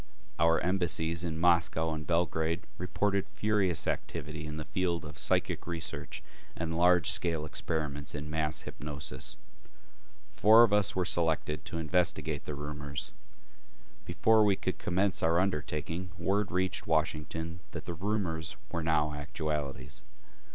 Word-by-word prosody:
Our 85 0 +4
embassies 85 -2 0
in 80 -2 -2
Moscow 80 -1 +3
and 75 -1 -5
Belgrade 85 0 +1 0.2
reported 100 +2 0
furious 105 -5 +1
activity 75 +2 -3
in 75 0 -5
the 75 - -4
field 85 -2 -1
of 75 -1 -7
psychic - - 0
research 85 -3 -5 0.3
and 80 0 -2
large 90 -1 +5
scale 80 -3 0
experiments 75 -2 -3
in 75 +1 -4
mass 75 -1 -1
hypnosis. 75 -1 -6 0.9
Four 110 +2 +7
of 110 -3 +4
us 105 0 +2
were 90 -1 +1
selected 80 -3 +1
to 85 - -4
investigate 80 -2 0
the 75 - -4
rumors. 75 -1 -5 0.9
Before 110 -1 +4
we 100 -2 +4
could - - -3
commence 95 +2 +1
our 80 +1 +3
undertaking, 85 0 -1
word 95 +3 0
reached 95 +1 0
Washington 80 +1 -1
that - - -7
the 85 - -3
rumors 85 -4 -2 0.2
were 85 - -1
now 75 -2 +2
actualities. 75 -3 -4
80 Hz, 135 wpm, -31 LUFS, 75-90 Hz, 0.9 s, Four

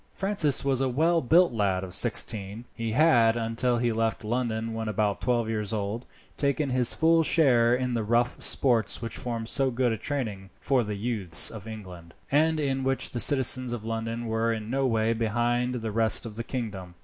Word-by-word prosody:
Francis 190 -9 +1
was 135 -2 0
a 135 - 0
well 165 +6 +1
built 165 +3 +3
lad 100 -4 -1
of 95 - -7
nearly - - -7
sixteen. 105 +3 -1
He 115 -2 -4
had, 120 -6 +3
until 115 +2 -1
he 120 0 0
left 115 0 -2
London 115 -1 -3
when 110 0 -5
about 105 -1 -1
twelve 120 -2 0
years 110 -1 -3
old, 105 +3 -4 0.3
taken 140 0 -1
his 125 -1 +2
full 165 +1 +3
share 125 -7 +3
in 125 0 -3
the 115 - -1
rough 120 +3 -1
sports 120 -6 +3
which 115 0 -6
formed 115 -2 -5
so 135 +2 +2
good 125 -1 0
a 110 - -2
training 105 -7 -5
for 130 -3 0
the 105 -1 -5
youths 100 -6 +2
of 110 -1 -10
England, 90 -6 -11 0.2
and 155 +2 +2
in 135 -2 -2
which 135 0 0
the 120 - -4
citizens 130 -2 +3
of 110 -2 -7
London 115 +1 -4
were 115 0 -1
in 110 0 -5
no 135 0 0
way 115 -1 0
behind 120 +2 -1
the 115 -2 -4
rest 110 +2 +2
of 110 -2 -8
the 115 - -5
kingdom. 100 -9 -6
115 Hz, 195 wpm, -26 LUFS, 110-130 Hz, 0.3 s, built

